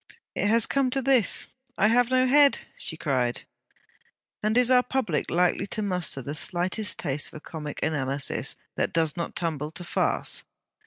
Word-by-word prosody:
'It - - 0
has 225 +1 +4
come 275 -2 +1
to 270 - -1
this 260 -4 +3 0.3
I 210 - +4
have 245 +1 +3
no 255 0 +3
head,' 285 +2 +5 0.2
she 160 - -4
cried. 130 -6 -1 1.0
And 215 +2 +1
is 250 0 +3
our 250 -1 +6
public 250 - -2
likely 180 +2 +1
to 215 +2 -1
muster 180 -8 -1
the 140 - -5
slightest 185 +6 -1
taste 145 -2 -2
for - - -10
comic 150 -2 -7
analysis 140 -3 -1 0.2
that - - -1
does 160 -2 +1
not 170 -1 -5
tumble 155 -3 -2
to 170 +3 -7
farce? 175 - 0
180 Hz, 165 wpm, -26 LUFS, 150-245 Hz, 1.0 s, our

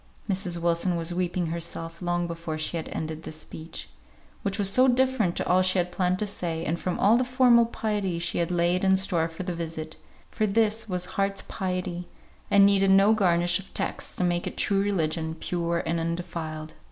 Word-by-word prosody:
Mrs. 185 -3 -1
Wilson 170 +1 +1
was 170 +1 -1
weeping 180 0 -1
herself 165 0 -5
long 175 0 0
before 165 -2 -5
she 155 +2 -1
had 160 - -4
ended 160 0 -4
this 155 - -8
speech, 160 +1 -8 0.5
which 200 -1 -2
was 200 -2 +1
so 255 +7 +4
different 255 -7 +2
to - - -1
all 185 +1 +4
she 185 +1 +2
had 180 0 0
planned 180 0 +1
to 210 - -1
say, 170 -5 -3
and 170 +2 -1
from 180 - -2
all 220 +4 +5
the 255 - +2
formal 250 -2 +4
piety 210 -6 -2
she 170 +1 -1
had 170 - 0
laid 175 +1 +1
in 190 0 +4
store 175 -4 +1
for 165 +2 -7
the 180 -1 -3
visit; 160 -2 -5 0.3
for 215 - 0
this 220 +1 +1
was 180 -1 0
heart's 195 +1 -1
piety, 180 -3 -3 0.4
and 200 -1 +6
needed 195 -1 +4
no 195 +3 +6
garnish 175 -3 +2
of 195 - -12
texts - - -2
to - - -1
make 175 -1 0
it - - -6
true 195 -1 +2
religion, 160 -5 -1
pure 170 0 -2
and 165 +1 0
undefiled. 165 -2 -4
180 Hz, 200 wpm, -26 LUFS, 170-195 Hz, 0.5 s, and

